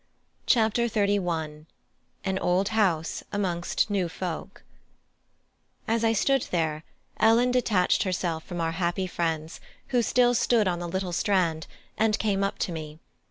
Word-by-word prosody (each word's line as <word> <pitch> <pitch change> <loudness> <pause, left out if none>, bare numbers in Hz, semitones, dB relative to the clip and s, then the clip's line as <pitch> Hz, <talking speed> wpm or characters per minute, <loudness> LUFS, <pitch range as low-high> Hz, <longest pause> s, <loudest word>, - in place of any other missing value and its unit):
CHAPTER 230 0 +3
XXXI: 175 -8 -1 0.6
AN 190 -1 0
OLD 185 +3 +1
HOUSE 190 -8 0
AMONGST 185 0 -1
NEW 190 -4 0
FOLK 175 -1 -6 1.2
As 230 +1 +1
I 225 - +4
stood 270 +4 +1
there 160 -3 -1 0.4
Ellen 230 +3 +4
detached 220 -7 +2
herself 175 -4 -1
from 175 -2 -6
our 165 -1 0
happy 175 +2 -1
friends 165 -3 -3 0.3
who 245 -2 +2
still 245 +1 +3
stood 235 -3 +2
on 175 -2 0
the 175 -1 -4
little 190 0 -3
strand 170 -4 +1 0.3
and 220 -1 +3
came 200 -2 0
up 195 - -1
to - - -6
me. 155 -2 -7
185 Hz, 140 wpm, -26 LUFS, 170-220 Hz, 1.2 s, I